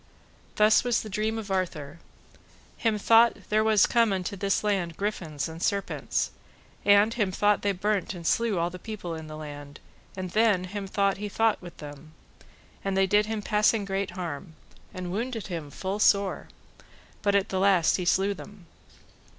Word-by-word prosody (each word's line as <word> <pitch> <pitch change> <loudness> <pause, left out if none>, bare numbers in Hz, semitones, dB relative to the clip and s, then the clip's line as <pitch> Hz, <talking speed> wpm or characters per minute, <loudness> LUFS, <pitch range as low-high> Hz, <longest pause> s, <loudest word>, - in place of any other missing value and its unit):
Thus 215 +1 +5
was 245 -2 +1
the 215 - -8
dream 215 +3 -1
of 215 -3 -6
Arthur: 165 -5 -3 0.8
Him 225 -2 0
thought 230 +3 +5
there 215 +1 +3
was 220 -2 +5
come 230 -3 +3
into 190 +1 -2
this 195 +1 0
land 190 -6 -1
griffins 170 -8 -3
and 165 +1 -9
serpents, 200 +1 -1 0.5
and 205 +2 +5
him 210 -5 0
thought 205 +2 +2
they 200 - +1
burnt 200 +1 -1
and 170 -1 -9
slew 230 +1 +1
all 170 +1 0
the 180 - -9
people 200 -4 -6
in 160 -1 -7
the 155 0 -8
land, 145 -2 -9 0.4
and 185 -1 -4
then 215 -4 +3
him 195 +2 -5
thought 195 0 +1
he 210 +1 -5
fought 225 +1 +1
with 175 -1 -11
them, 150 +1 -11 0.7
and 195 -1 -1
they 195 - +4
did 210 +2 +3
him 220 -1 -3
passing 210 0 +2
great 195 0 -2
harm, 165 -1 -6 0.4
and 185 -2 -6
wounded 225 +2 -3
him 160 -4 -5
full 190 +7 -4
sore, 200 -2 +2 0.7
but 200 -1 +2
at 200 -1 +2
the 190 - -1
last 190 -4 +4
he 180 - -3
slew 195 +3 +2
them. 200 -1 -12
195 Hz, 175 wpm, -27 LUFS, 175-210 Hz, 0.8 s, Thus